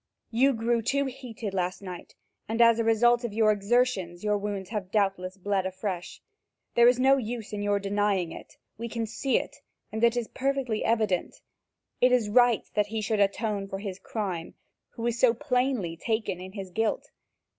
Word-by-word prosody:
You 265 +4 +4
grew 230 0 +1
too 280 +5 +1
heated 245 -6 -6
last 185 -1 -1
night 180 -2 -9 0.3
and, 225 +1 -2
as 230 -1 +6
a - - +2
result 240 +2 +4
of 235 -3 -3
your 220 -1 +4
exertions, 205 -4 0
your 210 -1 +2
wounds 200 -2 -3
have 205 -4 -4
doubtless 195 -2 0
bled 195 0 0
afresh. 185 -1 -5 0.5
There 235 0 +6
is 250 0 +4
no 270 +1 +5
use 230 -3 -5
in 205 - -3
your 205 0 +1
denying 200 -3 0
it; - - -11 0.2
we 235 0 -4
can 230 0 -2
see 230 +5 0
it, - - -5 0.3
and 220 +1 -3
it 235 +1 +4
is 235 -2 -1
perfectly 265 -5 -1
evident. 215 -6 0 0.6
It 250 - +5
is 240 -4 +2
right 245 0 +4
that 210 -1 +1
he 220 +1 -3
should 215 0 -1
atone 200 0 0
for 195 - -5
his 195 -1 -6
crime, 185 -7 -4 0.3
who 230 - -6
is 235 0 -1
so 240 -2 +5
plainly 250 - 0
taken 210 -1 -2
in 185 +1 -9
his 195 -3 -7
guilt. 225 +4 -1
220 Hz, 185 wpm, -27 LUFS, 195-235 Hz, 0.6 s, as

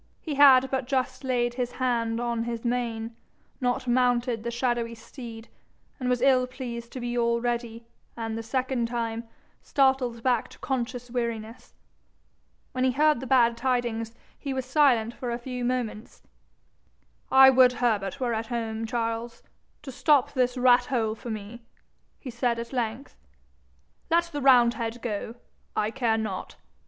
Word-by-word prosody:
He 310 - -5
had 265 -2 +6
but 265 -2 -1
just 260 0 -1
laid 245 -2 0
his 245 -1 -3
hand 235 -3 0
on 235 -1 -1
his 235 0 -5
mane, 230 -2 -2 0.5
not 245 0 -1
mounted 245 -1 +2
the 235 - -3
shadowy 235 -1 -1
steed, 230 0 -10 0.5
and 250 -1 -1
was 250 0 +1
ill 255 -2 +4
pleased 240 -2 -7
to 260 - -5
be 240 0 -3
already, 235 0 -1 0.3
and 225 -1 -3
the 225 - -3
second 255 0 -1
time, 230 -1 -3 0.4
startled 265 -4 +1
back 245 -3 +1
to - - -16
conscious 250 -2 -3
weariness. 230 -2 -4 1.0
When 255 - -1
he 260 -1 +2
heard 300 0 +3
the 265 - -6
bad 235 -2 +4
tidings 235 -2 -1 0.2
he 275 -2 -4
was 260 -1 -2
silent 255 -5 +3
for 245 - -5
a 235 - -1
few 250 0 -5
moments. 240 -3 -3 1.1
'I 265 0 +9
would 255 -1 +6
Herbert 220 -4 -1
were 245 -3 0
at 225 0 -3
home, 225 -2 -3
Charles, 230 0 -3 0.4
to 270 - -7
stop 285 0 +3
this 250 -1 +1
rat 245 0 +5
hole 225 -4 0
for 235 +2 -9
me,' 220 +2 -6 0.6
he 255 - -7
said 235 0 0
at 235 +2 -6
length. 240 +2 -3 0.9
'Let 335 +1 +4
the 290 - -3
roundhead 240 -3 +4
go 220 0 -4 0.4
I 215 +1 0
care 235 -3 +1
not. 210 -4 -4
240 Hz, 155 wpm, -26 LUFS, 230-255 Hz, 1.1 s, I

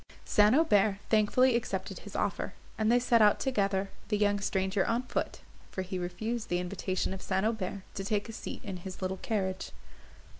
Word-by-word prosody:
St. 210 +3 +5
Aubert 210 -10 +4
thankfully 230 +4 +4
accepted 235 0 -2
his - - -11
offer, - - -1 0.2
and 220 +1 +2
they 240 - +6
set 240 -2 +4
out 210 -1 +5
together, 200 -6 0 0.2
the 210 - +1
young 205 -1 +2
stranger 190 -1 0
on 235 +2 0
foot, - - -3 0.3
for 190 - -3
he 185 0 -4
refused 215 +6 -3
the 175 - +1
invitation 185 +1 -2
of 190 - -7
St. 190 +1 0
Aubert 200 -3 -2
to 195 - -4
take 205 +2 -1
a 225 - -7
seat - - -6
in 195 -3 -5
his 185 +1 -7
little 190 +1 -1
carriage. 190 -2 -2
205 Hz, 185 wpm, -30 LUFS, 190-220 Hz, 0.3 s, they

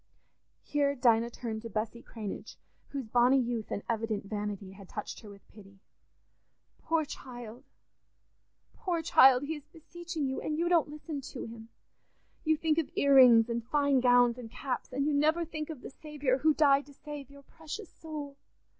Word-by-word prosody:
Here 285 -1 +1
Dinah 235 -2 +3
turned 225 -2 -5
to 230 - -7
Bessy 220 +2 -3
Cranage, 215 -4 -7 0.3
whose 275 -3 -4
bonny 245 +4 +4
youth 235 -3 -2
and 200 - -3
evident 220 -3 -2
vanity 205 -2 -4
had 195 -1 -13
touched 210 - -6
her 215 - -12
with 200 -1 -15
pity. 195 -2 -16 1.0
"Poor 320 -1 0
child! 245 -2 -9 1.1
Poor 345 -4 -2
child! 265 -4 +6
He 300 +3 -2
is 295 -3 -9
beseeching 340 -1 -6
you, 265 0 -2
and 305 - -2
you 340 +1 +1
don't 335 -4 +3
listen 300 -1 -6
to 265 -1 -7
him. 225 0 -10 0.7
You 315 -1 +2
think 320 0 +1
of 320 - -2
ear 280 0 +3
rings 240 -4 +8
and 235 -1 -2
fine 280 +2 +2
gowns 245 -1 +4
and 230 -2 -8
caps, 255 +2 -4
and 275 +2 -1
you 300 - +1
never 310 +4 +2
think 310 -1 -6
of 305 -6 -7
the - - -9
Saviour 290 -3 -2
who 310 +2 +3
died 280 -2 +4
to 285 - -15
save 295 -2 -8
your 280 0 -15
precious 325 +7 -9
soul. 295 -3 -8
270 Hz, 175 wpm, -30 LUFS, 230-300 Hz, 1.1 s, rings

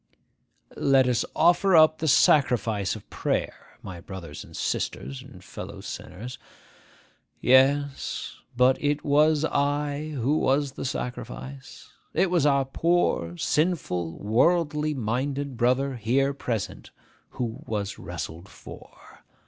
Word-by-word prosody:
'Let 135 -2 +3
us 125 -1 +1
offer 175 +3 +4
up 155 0 +6
the 160 - -1
sacrifice 115 -9 +3
of - - -11
prayer, - - -3
my 90 -3 -8
brothers 85 -5 -8
and - - -12
sisters 65 +1 -3
and - - -14
fellow - - -8
sinners.' 115 +6 -8 1.0
Yes; 135 +2 +2 0.2
but 125 +3 +3
it 145 0 0
was 150 +1 +3
I 145 +1 -1
who 135 +6 +1
was 140 +1 +1
the 135 - -7
sacrifice. 130 +1 -6 0.2
It 190 - +2
was 165 -5 +3
our 140 -1 +3
poor, 135 - 0
sinful, 130 - -1
worldly 150 +6 +1
minded 135 +4 -2
brother 130 +2 +1
here 135 +5 +1
present 115 -7 -4 0.5
who 115 -2 -3
was 105 -2 -3
wrestled 85 +5 -7
for. - - -14
135 Hz, 115 wpm, -26 LUFS, 115-150 Hz, 1.0 s, up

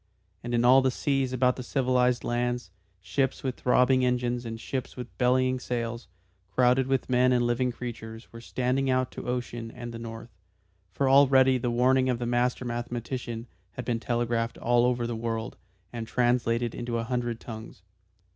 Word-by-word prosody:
And 120 0 -2
in 120 +1 +2
all 130 +2 +7
the 130 - +2
seas 135 0 0
about 125 0 +2
the - - -4
civilised 125 -1 +1
lands, 120 -3 -2 0.3
ships 135 +6 -1
with 130 -2 -2
throbbing 125 +1 +3
engines, 125 -1 0
and 115 0 -6
ships 130 +3 -5
with 125 -1 -8
bellying 130 0 +2
sails, 120 -1 -4 0.5
crowded 125 +1 +4
with 135 -1 0
men 125 0 +3
and 120 -1 +3
living 120 +1 +1
creatures, 115 -1 -7
were 115 - -9
standing 130 +2 -1
out 130 -1 +1
to - - -8
ocean 120 -2 -3
and 120 0 -8
the 115 - -6
north. 115 0 -8 0.6
For 135 +8 0
already 135 -1 +5
the 120 - -1
warning 130 +2 +3
of 125 - +1
the 120 - -3
master 120 +1 0
mathematician 120 0 -4 0.3
had 125 - -6
been 120 -2 -1
telegraphed 120 0 -1
all 120 0 +3
over 125 -1 +1
the 120 0 -3
world, 115 0 -3 0.4
and 115 -2 -5
translated 120 -1 +1
into 120 -1 -3
a 115 - -1
hundred 120 -1 -2
tongues. 110 -5 -9
125 Hz, 175 wpm, -27 LUFS, 120-125 Hz, 0.6 s, all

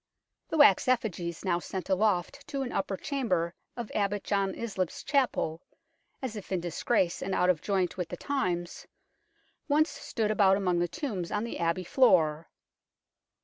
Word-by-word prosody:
The 320 - -1
wax 285 -10 +6
effigies, 185 -9 -1
now 175 -2 +2
sent 185 +1 -5
aloft 190 -2 0
to 275 -1 -2
an 245 - -5
upper 195 0 -2
chamber 185 - -1 0.2
of 235 -3 -5
Abbot 205 0 0
John 195 -2 0
Islip's 195 -6 -3
Chapel, 255 - 0 0.6
as 245 -4 -3
if 205 -2 -8
in 185 - +1
disgrace 175 +2 0
and 190 - -2
out 180 0 +4
of 160 -4 -4
joint 190 -3 0
with 180 -3 -3
the - - -5
times, 180 -12 -2 0.8
once 310 +2 +3
stood 215 -2 -2
about 195 -2 +4
among 180 -3 +1
the 175 - +1
tombs 190 - -4
on 210 - 0
the 235 - -5
Abbey 170 +2 0
floor. 165 - +3
195 Hz, 160 wpm, -29 LUFS, 175-235 Hz, 0.8 s, wax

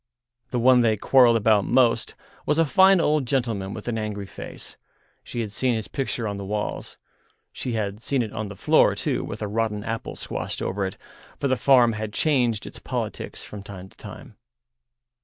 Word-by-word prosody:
The 125 - -2
one 125 +1 +5
they 110 -2 +2
quarrelled 120 +1 +5
about 105 -2 +3
most 120 +1 +2 0.3
was 150 - +2
a 165 - +4
fine 190 +4 +5
old 150 -5 +1
gentleman 115 -7 -1
with 105 +2 -8
an 115 -2 -1
angry 105 -2 -4
face—she 115 +4 -10
had 110 -3 -4
seen 125 +2 0
his 110 -2 -4
picture 125 -4 -3
on 100 -1 -3
the 100 - -6
walls. 105 +2 -4 0.6
She 125 - -4
had 105 -1 -3
seen 135 0 0
it 110 - -7
on 110 -1 -4
the 105 - -8
floor - - +4
too, - - -1
with - - -6
a - - -2
rotten 105 -1 -1
apple 115 +1 -4
squashed - - -4
over 95 0 -2
it, 95 - -8 0.4
for 140 - -1
the 130 - +2
farm 125 -3 +4
had 105 -1 -5
changed 120 -8 +1
its - - -9
politics - - -5
from 105 - -9
time 95 -2 -10
to - - -25
time. 110 +3 -11
115 Hz, 190 wpm, -24 LUFS, 105-130 Hz, 0.6 s, one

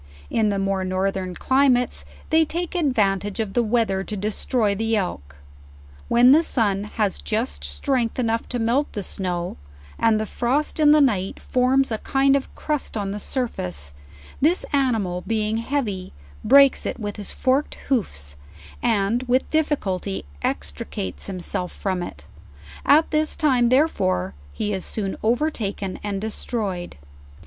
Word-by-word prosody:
In 215 -2 +2
the 200 - 0
more 195 -1 0
northern 185 0 -1
climates 260 0 +2 0.3
they 320 0 +5
t 340 +3 -2
eake - - -16
the 360 - -1
advantage 205 - +1
of 210 -3 -2
the 240 - +3
weather 220 -4 +1
to 210 - -4
destroy 210 +2 0
the 225 +2 0
elk;; 75 - -3 0.7
when 245 +2 +6
the 305 +4 +7
sun, 205 -10 +1
has 70 - 0
just 70 0 -2
strength, 225 - 0
LEWIS - - -3
AND 235 - 0
CLARKE. 225 +1 +1
67 235 -1 -3
enough - - +1
to 235 - +2
melt 285 +3 0
the 205 - -3
snow, 180 - -3 0.4
and 225 -1 +3
the 215 - -1
frost 265 +9 -1
in 300 -1 +6
the 300 0 +7
night 200 -8 +1
forms 255 +1 +2
a 220 - -1
kind 270 0 +3
of 275 - 0
a - - -19
crust 300 -6 -2
on 200 -2 -2
the 205 - -4
surface, 90 - -3 0.5
this 325 +6 +3
animal 225 -10 +1
being 220 -1 0
heavy, 230 -7 -2 0.3
breaks 275 +3 +6
it - - -4
with 205 -1 -4
his 205 - -6
forked 265 +3 0
hoofs, 70 - -1 0.5
and 225 0 +1
with 255 +2 +1
difficulty 200 - -1 0.2
extricates 75 - -4
him 185 -2 -4
self 180 0 -2
from 185 -3 -2
it: 75 - -8 0.6
at 310 +3 +5
this 310 0 +2
time 255 -6 +3
therefore 95 - +2 0.2
he 205 - -2
is 190 - -3
soon 195 -3 -3
overtaken 220 -6 -1
and 200 -1 -2
destroyed. 205 - -4
220 Hz, 165 wpm, -23 LUFS, 190-260 Hz, 0.7 s, the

